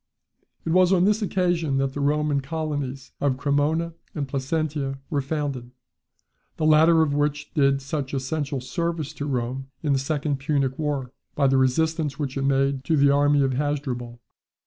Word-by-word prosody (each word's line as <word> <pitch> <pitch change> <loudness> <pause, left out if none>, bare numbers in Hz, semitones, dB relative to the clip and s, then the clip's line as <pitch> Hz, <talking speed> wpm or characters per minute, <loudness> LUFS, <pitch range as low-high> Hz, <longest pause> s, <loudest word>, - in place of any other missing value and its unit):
It 165 - -1
was 185 +1 +5
on 185 -1 +4
this 210 +2 +2
occasion 175 -7 0
that 135 0 0
the 145 - -4
Roman 145 0 +1
colonies 145 -3 -4
of 140 -2 +1
Cremona 150 +4 0 0.2
and 145 -3 -2
Placentia 140 0 -2
were 145 -2 +1
founded, 135 -4 -3 0.9
the 155 - 0
latter 160 +1 +6
of 145 -2 0
which 145 0 -1
did 140 -2 +2
such 140 -1 -3
essential 135 0 -2
service 165 +2 -3
to 145 - -5
Rome 130 0 -2 0.2
in 145 -2 +2
the 135 - +2
second 145 0 -1
Punic 135 -1 0
war, 145 -5 -2 0.2
by 140 - +2
the 135 0 +4
resistance 150 +3 +1
which 140 -3 -3
it 135 - -1
made 135 0 +1
to 160 +1 +2
the 140 0 +5
army 145 0 +4
of 135 -1 +1
Hasdrubal. 130 -4 -3
145 Hz, 170 wpm, -24 LUFS, 135-155 Hz, 0.9 s, latter